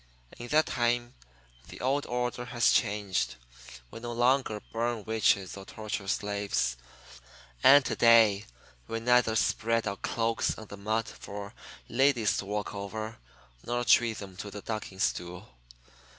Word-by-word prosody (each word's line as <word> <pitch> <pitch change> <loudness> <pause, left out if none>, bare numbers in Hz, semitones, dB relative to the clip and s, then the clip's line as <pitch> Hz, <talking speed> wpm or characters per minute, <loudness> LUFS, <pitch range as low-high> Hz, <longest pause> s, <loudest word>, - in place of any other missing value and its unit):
In 120 - -7
that 155 +4 +3
time 120 -1 0 0.5
the - - -11
old 140 +3 0
order 125 0 -2
has 120 -1 +2
changed. 100 -3 0 0.6
We - - -8
no 120 0 -5
longer 120 -2 +2
burn 115 -1 -1
witches 100 -3 +1
or 100 - -9
torture 105 -1 -5
slaves. 100 - -1 0.9
And 140 0 +8
to - - -1
day 115 -4 +5 0.4
we 115 - -3
neither 120 -1 +3
spread 115 +1 +1
our 100 0 -3
cloaks 115 +2 -1
on 110 - -10
the - - -7
mud 110 +3 -1
for 100 0 -8 0.3
ladies 125 -4 +2
to - - -3
walk 105 0 -3
over 110 +2 -6 0.4
nor 120 +1 -1
treat 115 -2 +4
them 95 -2 -9
to 105 - -6
the 100 0 -8
ducking 110 -3 -5
stool. 90 +2 -2
110 Hz, 145 wpm, -29 LUFS, 100-120 Hz, 0.9 s, And